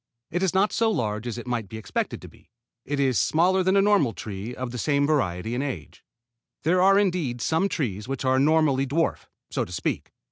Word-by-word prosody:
It 175 - -1
is 190 -1 +1
not 200 +2 +3
so 225 0 +2
large 110 - -2
as 120 - -4
it 120 - -7
might 120 -5 -3
be 110 - -7
expected 110 - -3
to - - -8
be. - - -20 0.4
It 145 +1 -2
is 130 -7 +2
smaller 180 - +3
than 190 +2 +3
a 195 - +5
normal 195 - +3
tree 105 +3 -6
of 130 -1 -5
the 125 - -5
same 145 +2 +2
variety 115 - 0
and 125 +3 -1
age. 95 - -6 0.6
There 180 +3 +3
are 195 +1 +6
indeed 175 -11 0
some 165 +10 +1
trees 110 - -3
which 135 0 -4
are 130 0 +3
normally 145 -2 +3
dwarf, 165 +5 -1 0.2
so - - 0
to - - -9
speak. 85 - -3
140 Hz, 215 wpm, -25 LUFS, 120-175 Hz, 0.6 s, are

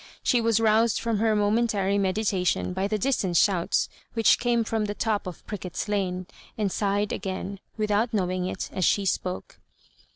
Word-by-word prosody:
She 245 -2 +3
was 225 -1 +2
rous 225 0 +3
ed - - -1
from 230 -3 0
her 220 0 +2
momentary 205 -2 +1
meditation 190 -2 0
by 190 +2 -1
the 215 +1 -1
distant 200 -7 0
shouts 180 -3 +2 0.3
which 225 -1 +4
came 240 -1 +2
from 220 -1 -1
the 205 0 -4
top 210 -4 -1
of 180 - -8
Prickett's 190 -2 -5
Lane, 185 -3 -1 0.3
and 205 -3 0
sighed 205 +1 0
again, 190 0 -4 0.2
without 215 +2 +1
knowing 185 -3 -1
it, - - -5
as 185 - -1
she 200 +3 +2
spoke. 185 -1 -3
205 Hz, 170 wpm, -26 LUFS, 190-220 Hz, 0.3 s, which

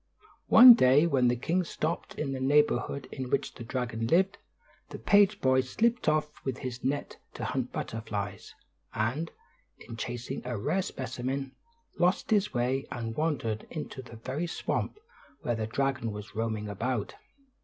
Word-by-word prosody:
One 245 +2 +11
day 145 - +5
when 135 -7 +3
the 120 - +3
king 170 +9 0
stopped 165 0 -3
in 145 -3 -3
the 135 - -3
neighborhood 140 -1 +2
in 130 -1 -5
which 140 +1 0
the 120 - -9
dragon 115 -2 -3
lived, 190 - +2 0.5
the - - -7
page 205 0 +4
boy 130 0 +3
slipped 230 - +1
off 155 -1 -1
with 130 -2 -3
his 125 -1 -6
net 140 +2 -2 0.2
to - - -4
hunt - - -2
butterflies; 105 -3 -5 0.4
and, 125 +10 -1 0.5
in 115 - -10
chasing 120 +2 -4
a 120 -2 -3
rare 185 - 0
specimen, 130 -2 -4 0.5
lost 180 +4 +2
his 210 -1 +3
way 130 +2 -1
and 115 -2 -4
wandered 125 -9 -1
into 150 -4 -6
the 120 -2 -12
very 130 +9 -4
swamp 170 - -2 0.4
where 120 - -1
the 110 -1 -2
dragon 130 -1 -1
was 105 0 -8
roaming 110 -1 -2
about. 110 +2 -2
130 Hz, 155 wpm, -29 LUFS, 115-155 Hz, 0.5 s, One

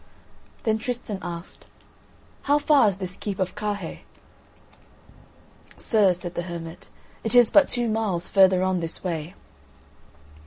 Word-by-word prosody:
Then 220 -1 +1
Tristan 235 -4 -4
asked: 170 0 -8 0.8
"How 290 - +5
far 295 -5 +4
is 200 - +1
this 185 -1 -5
keep 200 -3 -5
of 185 -1 -2
Carhaix?" 205 -5 -5 1.8
"Sir," 205 -5 +2
said 175 0 -7
the 175 - -3
hermit, 165 0 -8 0.4
"it 225 +1 +2
is 245 -2 +6
but 295 -2 +5
two 240 -1 +1
miles 215 -6 -1
further 190 -2 +4
on 185 -1 0
this 165 -1 -1
way." 170 0 -4
195 Hz, 130 wpm, -24 LUFS, 175-220 Hz, 1.8 s, is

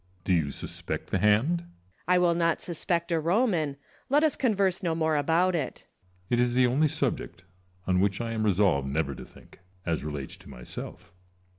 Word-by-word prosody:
Do 95 - +1
you 80 -5 +2
suspect - - -5
the 95 - +1
hand? 110 - +3
Lucullus. 170 - -17 0.3
I 180 0 +4
will 175 -1 +4
not 170 -1 +1
suspect 170 0 -2
a 165 - +2
Roman: 170 - +1 0.3
let 290 +3 +4
us 310 - +3
converse 200 -7 +1
no 170 -4 0
more 160 -1 +1
about 165 +5 +2
it. 150 -7 -3
Ccesar. 90 0 -37
It 120 - +3
is 125 0 +2
the 130 0 +5
only 135 +6 +3
subject - - -2 0.4
on 90 -1 +2
which 100 0 +1
I 115 -1 -3
am 110 -1 -2
resolved 95 -9 +2
never 70 0 -1
to - - -9
think, - - -17 0.3
as 85 -3 -1
relates 75 -3 -4
to - - -15
myself. - - -8
140 Hz, 190 wpm, -28 LUFS, -, 0.4 s, the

